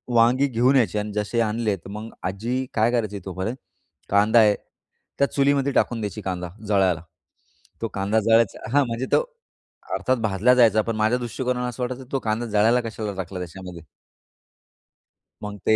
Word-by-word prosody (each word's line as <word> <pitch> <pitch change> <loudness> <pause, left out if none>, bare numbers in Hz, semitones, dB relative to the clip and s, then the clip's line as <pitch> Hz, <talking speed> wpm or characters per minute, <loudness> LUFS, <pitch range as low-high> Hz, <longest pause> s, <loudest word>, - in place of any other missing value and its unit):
वांगी 125 +4 +4
घेऊन 125 +1 +2
यायची 115 -5 +2
अन् 105 0 -2
जसे 105 +3 -1
आणले, 110 -1 0
तर 95 0 -13
मग 105 +3 -7 0.2
आजी 120 +7 -2
काय 115 +2 +2
करायची 110 -4 -1
तोपर्यंत, 95 +5 -3 0.5
कांदा 105 +4 +4
आहे, 105 -2 +5 0.6
त्या 140 - +4
चुलीमध्ये 140 0 +2
टाकून 120 -2 +1
द्यायची 105 0 -4
कांदा, 90 -2 -4 0.2
जळायला. 95 -5 +2 0.8
तो 115 - -1
कांदा 100 +3 +1
जळायचा 115 -1 +2
हां, 145 -1 +4
म्हणजे 115 +3 -3
तो - - +4 0.7
अर्थात 130 0 0
भाजला 110 +4 +3
जायचा, 110 -3 +5
पण 115 +1 -3
माझ्या 110 +3 +2
दृष्टिकोनाने 125 +1 -2
असं 125 +1 -5
वाटायचं 130 +1 -4
तो 135 - 0
कांदा 115 0 -2
जळायला 110 +3 +3
कशाला 110 -2 -5
टाकला 90 +1 -7
त्याच्यामध्ये. 90 0 -8 1.6
मग 105 0 -5
ते 110 - +5
110 Hz, 160 wpm, -23 LUFS, 105-125 Hz, 1.6 s, आहे